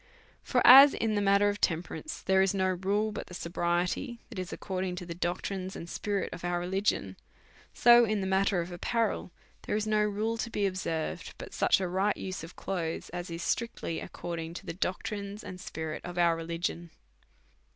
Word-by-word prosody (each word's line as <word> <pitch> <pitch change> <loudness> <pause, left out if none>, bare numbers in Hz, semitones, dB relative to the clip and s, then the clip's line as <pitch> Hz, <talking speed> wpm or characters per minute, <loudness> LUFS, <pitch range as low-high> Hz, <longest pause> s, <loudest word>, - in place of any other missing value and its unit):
For - - +1
as, 275 +3 +10
in 225 -1 0
the 205 - +1
matter 200 +1 +4
of 205 0 -4
temperance, 180 - -2
there 190 0 +4
is 195 +1 +2
no 190 -1 +2
rule 200 +4 0
but 210 - -6
the 180 - -9
sobriety 175 +8 -1
that 225 -6 -7
is 185 -1 -5
according 185 -2 -3
to 180 - -6
the 170 - -5
doctrines 185 +2 -3
and 165 - -7
spirit 200 +2 -2
of 175 - -8
our 175 0 0
religion; 180 - -1 0.5
so 240 0 +7
in 215 -2 +1
the 190 - -2
matter 190 -1 +2
of 170 +2 -6
apparel, 215 +2 -1 0.4
there - - 0
is 215 0 0
no 215 0 +2
rule 210 +2 0
to 230 - -2
be 205 -3 0
observed 175 -4 -3
but - - -9
such - - +3
a 190 - -1
right 190 +3 +1
use 185 -3 -5
of 165 - -10
clothes 170 -4 -3
as 175 0 -5
is 165 0 -5
strictly 230 -7 -2
according 170 -1 -6
to - - -8
the - - -4
doctrines 200 +3 -3
and 180 0 -8
spirit 160 -4 -5
of 175 0 -7
our 170 -1 +4
religion. 170 +1 -3
185 Hz, 195 wpm, -30 LUFS, 175-205 Hz, 0.5 s, as